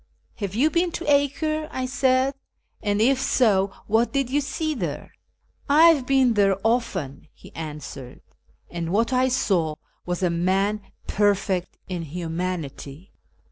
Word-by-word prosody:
" - - -41
Have 200 -1 -3
you 295 +7 +3
been 345 0 +1
to 350 - -4
Acre? 300 +2 +1
" - - -18
I - - -1
said, 260 0 +2 0.2
" - - -43
and 205 -1 0
if 260 +4 +3
so, 200 -8 +2
what 225 +3 +2
did 275 -3 -1
you 290 +2 +2
see 310 +2 -2
there? 175 - -5 0.2
" - - -46
" - - -43
I 315 +4 +7
have 285 -6 +2
been 265 -3 +4
there 195 -2 +3
often," 215 - -1
he - - -15
answered, 150 -5 -7
'"■ - - -38 0.3
and 170 -1 -4
what 230 +5 +1
I 255 +1 +3
saw 180 -11 +1 0.3
was 180 +1 -3
a 180 - +2
man 195 +5 +1 0.2
perfect 195 -3 0
in 180 -2 -4
humanity." 165 -1 -5
210 Hz, 170 wpm, -24 LUFS, 175-265 Hz, 0.3 s, I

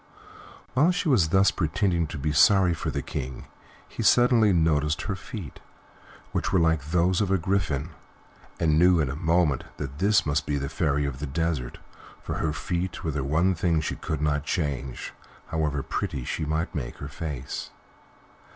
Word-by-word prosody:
While 145 +7 +4
she 180 -2 -1
was 100 - +4
thus 95 +3 +4
pretending 85 0 0
to 75 - -6
be 75 +2 -1
sorry 95 +3 +5
for - - -3
the - - -3
King, 65 -1 -5 0.4
he - - -6
suddenly 120 -4 +5
noticed 75 -3 +2
her 100 - -2
feet, 95 -3 -8 0.7
which - - -1
were - - +3
like 80 -3 +2
those 90 +2 +2
of 100 - 0
a 95 - +3
griffin, 80 -5 -1 0.7
and 80 -2 +3
knew 90 0 +5
in 70 -4 0
a - - -4
moment 80 -3 +1
that 70 0 -6
this 100 +2 +3
must 75 0 0
be 75 - 0
the 70 0 -3
Fairy 75 -1 0
of 70 -2 -4
the 75 - -4
Desert, 70 -4 -2 0.5
for - - -4
her 80 - 0
feet 90 +4 -3
were 80 - -1
the 70 -2 -2
one 80 +7 +2
thing 85 -2 +1
she 75 - -2
could 75 -1 -4
not 75 -1 +1
change, 70 -5 -3 0.4
however 75 -3 -1
pretty 65 - -3
she - - -2
might 80 +3 -2
make 70 -8 -5
her - - -6
face. 70 -5 -5
80 Hz, 180 wpm, -26 LUFS, 75-90 Hz, 0.7 s, sorry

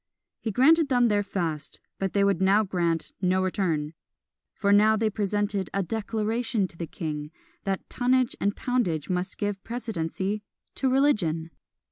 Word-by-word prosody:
He 225 - -3
granted 290 +8 +4
them 245 -3 +4
their 205 -1 +2
fast, 165 -7 -3 0.2
but 195 -1 -1
they 200 - +3
would 200 -2 +2
now 195 +3 +4
grant 170 -4 -1
no 185 0 +2
return; 165 -5 -1 0.6
for 200 -1 0
now 215 +2 +6
they 220 0 +1
presented 205 -2 -1
"a 195 - +1
Declaration" 220 +1 -1
to - - -11
the 165 0 -5
king, 150 -3 -5 0.4
that 195 -1 -2
tonnage 255 0 +1
and 200 0 +1
poundage 185 - -1
must 180 +1 -2
give 205 -2 -2
precedency 210 -3 -3 0.3
to 265 - 0
religion! 180 - +2
200 Hz, 150 wpm, -26 LUFS, 180-225 Hz, 0.6 s, now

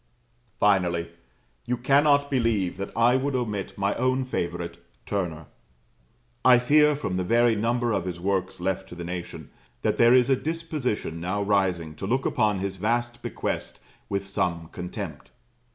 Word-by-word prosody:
Finally, 90 -4 +2 0.6
you 125 - -1
cannot 140 +3 +3
believe 115 -9 +1
that 100 +1 -4
I 120 +2 +5
would 135 +1 -1
omit 105 -6 -3
my 100 0 +1
own 130 +1 +1
favourite, 85 -8 -3 0.3
Turner. 85 -6 -3 1.0
I 125 0 +7
fear 150 +4 +4
from 95 -10 -3
the 90 - 0
very 115 +4 +3
number 120 +2 0
of 95 -4 0
his 90 -2 -4
works 95 0 -1
left 95 +1 -2
to - - -9
the 85 - -6
nation, 90 0 -6 0.3
that - - 0
there 120 +1 +7
is 125 -2 +5
a 135 - +4
disposition 150 - -3
now 95 +4 -1
rising 95 -6 +1
to 95 - -4
look 130 +5 0
upon 105 -2 +2
his 95 0 -3
vast 120 +4 -1
bequest - - -4 0.3
with 100 0 -2
some 85 -4 -2
contempt. 90 -1 -7
105 Hz, 155 wpm, -26 LUFS, 90-125 Hz, 1.0 s, I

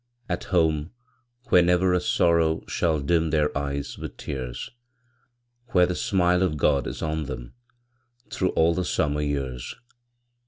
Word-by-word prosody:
At 90 - -3
home, 80 -4 +1 0.6
where 90 - +6
never 90 +1 +3
a 90 - +2
sorrow 85 -2 +2
Shall 80 -3 0
dim 80 +2 +1
their 75 -1 +1
eyes 70 -1 -3
with - - -7
tears! 65 -4 -5 1.0
Where 90 -1 +6
the 90 - -2
smile 90 -1 +2
of 85 -5 +1
God 70 -2 +2
is - - -5
on 80 -1 -2
them - - -7 0.8
Through 95 - 0
all 80 +1 +3
the 90 - -1
summer 75 -3 0
years! 70 -4 -3
80 Hz, 145 wpm, -25 LUFS, 70-90 Hz, 1.0 s, where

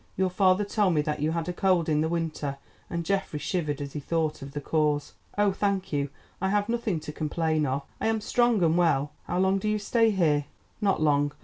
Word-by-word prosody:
Your 190 0 +1
father 190 +2 +3
told 200 -4 +1
me 150 - +2
that 150 0 -2
you 155 - +2
had 165 0 -2
a 180 - -2
cold 180 -3 +2
in 155 -1 +2
the 160 - 0
winter," 155 -4 -2 0.3
and 170 -1 -3
Geoffrey 190 -3 -1
shivered 150 -1 -2
as 140 -1 -6
he 150 - -3
thought 155 +1 -1
of 135 0 -8
the 145 - -3
cause. 150 -1 0 0.2
"Oh, 205 -1 +4
thank 195 -2 -1
you, 140 -1 0 0.3
I 190 - +1
have 205 0 +1
nothing 230 -7 -1
to 150 - -6
complain 155 0 0
of. 135 +2 -1 0.2
I - - +1
am 225 0 +1
strong 235 -2 +2
and 165 0 +3
well. 150 -4 +2
How - - -2
long 190 +1 +3
do 215 - -1
you 215 - +1
stay 225 +2 +2
here?" 155 -8 +2 0.4
"Not 195 -6 +2
long. 145 -1 +2
165 Hz, 225 wpm, -27 LUFS, 150-195 Hz, 0.4 s, Oh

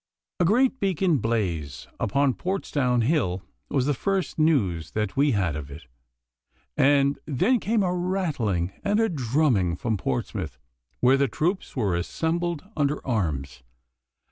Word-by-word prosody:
A 175 - +3
great 255 +8 +3
beacon 185 -5 +1
blaze 85 - -2
upon 135 +5 +2
Portsdown 140 -10 0
Hill 110 - 0 0.3
was 135 -3 +1
the 145 - +2
first 190 +4 -2
news 100 - +1
that 105 -2 -2
we 140 0 +3
had 95 -7 0
of 75 -2 -6
it, 70 +2 -10 0.9
and 140 0 +3
then 190 - +2
came 215 -1 +1
a 180 -1 0
rattling 150 - -1
and 205 +2 +2
a 225 0 +3
drumming 125 - +1
from 110 +4 -1
Portsmouth, 65 -3 -3 0.4
where 130 +2 +5
the 140 0 +2
troops 175 - -2
were 105 -9 +1
assembled 165 - -2
under 145 0 0
arms. 75 - -2
135 Hz, 140 wpm, -25 LUFS, -, 0.9 s, where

